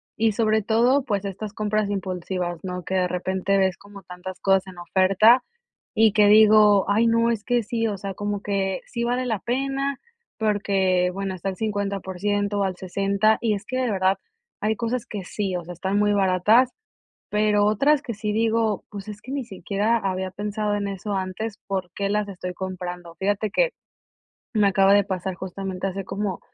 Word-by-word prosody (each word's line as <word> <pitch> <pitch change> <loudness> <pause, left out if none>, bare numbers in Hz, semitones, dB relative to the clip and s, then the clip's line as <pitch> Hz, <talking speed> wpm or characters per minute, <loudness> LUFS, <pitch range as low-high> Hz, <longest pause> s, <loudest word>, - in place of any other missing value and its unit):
y 225 0 +2
sobre 220 0 +2
todo, 235 +6 +3
pues, 205 -6 -2
estas 200 +2 -5
compras 215 0 0
impulsivas, 185 -2 -3
¿no? 180 -1 -4
Que - - -4
de 180 -1 +1
repente 190 +2 0
ves 190 -2 +2
como 200 -1 -13
tantas 180 +1 -8
cosas 195 -1 +2
en 185 -1 -11
oferta 195 +7 +4 0.5
y 220 -2 +4
que 210 -1 +5
digo: 210 -1 +6
"Ay 220 +3 +3
no, 230 +1 +3
es 220 -2 -2
que 245 -1 +1
sí", 230 0 -1
o 205 -2 -3
sea, 195 +1 -5
como 205 +1 -3
que 195 -2 -1
sí 235 -1 -4
vale 245 +2 0
la 225 -4 -1
pena 275 +4 -2 0.4
porque, 195 -4 +1
bueno, 195 0 -3
está 185 +2 -3
al 190 - -4
50% 205 -1 -1
al 190 -1 -1
60. 200 +4 +1
Y 225 -2 +2
es 200 0 -4
que 255 - -3
de 255 -3 0
verdad 190 -1 +2 0.4
hay 215 +1 +1
cosas 235 +1 -2
que 205 -3 -6
sí, 190 0 -3
o 175 - -3
sea, 175 +2 -8
están 190 +4 -1
muy 205 0 +3
baratas, 205 +6 +4 0.6
pero 210 -1 +2
otras 275 +8 +3
que 235 - -4
sí 210 0 -2
digo: 225 -1 +1
"Pues, 200 -1 -8
es 210 0 -8
que 255 - -9
ni 275 -2 -3
siquiera 205 +3 0
había 190 -3 -2
pensado 210 +1 -2
en 205 -1 -2
eso 200 +1 -4
antes, 195 +3 -4
¿por 190 -3 -3
qué 200 -1 -1
las 210 0 0
estoy 180 -1 -6
comprando?". 180 -2 -6
Fíjate 205 +1 0
que - - +2 0.8
me 210 -2 +4
acaba 195 0 +4
de 205 0 +5
pasar 190 -1 -3
justamente 190 +1 -5
hace 195 +1 -4
como 195 -1 -3
200 Hz, 190 wpm, -24 LUFS, 190-220 Hz, 0.8 s, digo